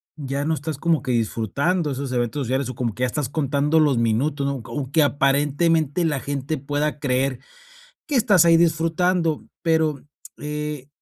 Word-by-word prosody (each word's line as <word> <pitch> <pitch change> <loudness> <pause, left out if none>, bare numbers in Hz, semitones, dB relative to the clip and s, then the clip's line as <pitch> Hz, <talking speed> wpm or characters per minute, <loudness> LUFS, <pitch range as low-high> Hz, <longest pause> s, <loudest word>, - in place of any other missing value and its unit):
ya 140 -1 -3
no 160 - +1
estás 155 -2 -4
como 165 -3 +1
que 130 -2 -3
disfrutando 140 - 0
esos 135 0 -4
eventos 120 +3 -1
sociales 130 +1 -1
o 130 - -6
como 120 -4 -2
que 125 - -9
ya 125 - +3
estás 130 0 -3
contando 145 +1 +1
los 145 -5 +3
minutos, 135 +6 0
¿no? 140 -1 -1
O 140 -2 -5
que 160 - +4
aparentemente 145 +3 +2
la 145 -4 0
gente 140 +3 -3
pueda 145 +2 -2
creer 130 -2 0 0.7
que 295 - -2
estás 205 -8 +5
ahí 165 0 +6
disfrutando, 165 0 +1 0.2
pero, 160 -4 +1 0.4
eh, 150 -2 -5
145 Hz, 170 wpm, -22 LUFS, 135-160 Hz, 0.7 s, ahí